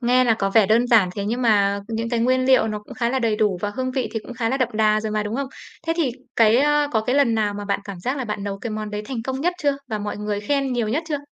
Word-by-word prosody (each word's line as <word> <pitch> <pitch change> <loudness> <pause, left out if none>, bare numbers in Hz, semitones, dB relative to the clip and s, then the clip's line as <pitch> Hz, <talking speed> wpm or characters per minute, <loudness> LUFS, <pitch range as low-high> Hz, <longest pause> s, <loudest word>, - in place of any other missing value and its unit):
nghe 250 +1 +3
là 230 -2 +4
có 195 -2 -1
vẻ 210 -1 +5
đơn 235 +3 +3
giản, 220 -7 +5
thế 200 - -3
nhưng 240 +4 -2
mà 200 -3 +3
những 230 0 -2
cái 235 -1 0
nguyên 255 +2 +2
liệu 260 -4 +4
nó 210 0 -3
cũng 210 - -12
khá 235 -1 0
là 265 - 0
đầy 225 -3 +1
đủ 205 -4 +1
và 205 - -2
hương 255 0 -1
vị 255 -2 -2
thì 225 - -1
cũng 245 - -9
khá 230 -1 -1
là 265 - 0
đậm 255 -3 +1
đà 215 0 +2
rồi 215 -1 -3
mà, 215 0 0
đúng 210 +3 -3
không? 275 -1 -2 0.4
Thế 330 - +2
thì, 300 -7 +1 0.3
cái, 225 0 +5
ơ, 295 +1 +3
có 220 - +2
cái 250 +4 -1
lần 235 -5 +3
nào 210 -2 0
mà 205 0 -5
bạn 200 0 -1
cảm 195 -3 -8
giác 255 +9 -2
là 260 - -2
bạn 210 -2 -4
nấu 195 -1 -4
cái 230 - -5
món 215 0 -4
đấy 210 0 -4
thành 235 -1 -4
công 265 +2 -3
nhất 355 +3 +1
chưa, 285 -1 +2
và 215 -2 -2
mọi 205 0 -4
người 210 -1 -3
khen 275 +3 0
nhiều 235 -3 -1
nhất 290 +10 0
chưa? 295 -2 -1
225 Hz, 325 wpm, -22 LUFS, 210-255 Hz, 0.4 s, vẻ